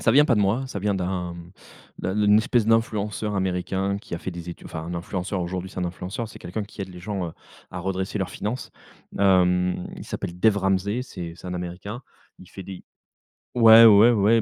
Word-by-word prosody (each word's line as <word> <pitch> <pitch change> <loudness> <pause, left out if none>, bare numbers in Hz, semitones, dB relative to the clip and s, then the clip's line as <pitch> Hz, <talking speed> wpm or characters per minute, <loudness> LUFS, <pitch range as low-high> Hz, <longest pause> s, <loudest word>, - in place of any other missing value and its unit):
Ça 115 - +3
vient 145 +5 +6
pas 125 - +3
de 105 - +2
moi, 110 +7 +1
ça 100 -6 -5
vient 100 0 0
d'un, 90 -1 -2
hem, 85 +1 -11 0.5
d'un 95 +2 -2
d'une 105 0 +5
espèce 115 0 +1
d'influenceur 110 -2 0
américain 95 +1 -1
qui 85 - -7
a - - -4
fait 95 - -5
des 85 0 -7
études 85 - -10
enfin 80 - -6
un 85 - -6
influenceur 90 +2 -3
aujourd'hui 90 +1 -4
c'est - - -9
un 90 - 0
influenceur, 90 +6 -5
c'est - - -13
quelqu'un 95 +5 -4
qui 100 0 -8
aide 95 - -6
les 90 - -11
gens, 95 0 -3
heu, - - -10 0.4
à 90 - -6
redresser 95 +2 -3
leurs 95 - -2
finances. 115 +5 -4 0.5
Hem, 90 -2 +3
il - - -8
s'appelle 85 - -5
Dave 110 +2 +4
Ramsey 95 +4 0
c'est 90 -9 -7
c'est - - -11
un 90 - -4
Américain, 90 +7 -6 0.4
il 90 - -14
fait 95 - -9
des 95 -1 -9 0.7
ouais 115 -1 +9
ouais 110 +2 +8
ouais 110 +1 +4
95 Hz, 215 wpm, -24 LUFS, 90-105 Hz, 0.7 s, ouais